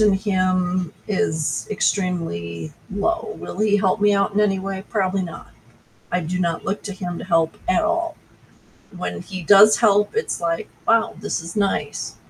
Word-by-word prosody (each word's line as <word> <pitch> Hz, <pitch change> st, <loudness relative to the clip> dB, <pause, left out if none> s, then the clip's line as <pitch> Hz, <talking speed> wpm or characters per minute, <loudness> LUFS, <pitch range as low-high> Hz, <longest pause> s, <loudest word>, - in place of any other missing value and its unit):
in 210 Hz, -2 st, +5 dB
him 185 Hz, -3 st, 0 dB, 0.2 s
is 160 Hz, -7 st, 0 dB
extremely 85 Hz, -, -1 dB, 0.2 s
low. 340 Hz, -, -1 dB
Will 180 Hz, -, -8 dB
he 210 Hz, -1 st, +3 dB
help 195 Hz, +1 st, +1 dB
me 205 Hz, 0 st, +4 dB
out 200 Hz, 0 st, +1 dB
in 205 Hz, -, +2 dB
any 195 Hz, -2 st, +2 dB
way? 195 Hz, 0 st, -5 dB
Probably 195 Hz, -3 st, 0 dB
not, 170 Hz, -2 st, -8 dB, 0.6 s
I 180 Hz, -, +1 dB
do 180 Hz, +3 st, -3 dB
not 170 Hz, -2 st, -1 dB
look 200 Hz, +2 st, -2 dB
to 200 Hz, -, -4 dB
him 175 Hz, -2 st, -5 dB
to -, -, -6 dB
help 165 Hz, -3 st, +1 dB
at 185 Hz, -, +3 dB
all, 335 Hz, 0 st, 0 dB, 0.8 s
when 180 Hz, -, -4 dB
he 185 Hz, 0 st, -7 dB
does 205 Hz, +5 st, +7 dB
help, 210 Hz, -, +3 dB
it's 455 Hz, -, -1 dB
like, 165 Hz, -1 st, -1 dB, 0.2 s
"Wow, 230 Hz, 0 st, +3 dB
this 210 Hz, -, -2 dB
is 165 Hz, +1 st, -8 dB
nice." 200 Hz, -2 st, -1 dB
190 Hz, 170 wpm, -22 LUFS, 175-210 Hz, 0.8 s, does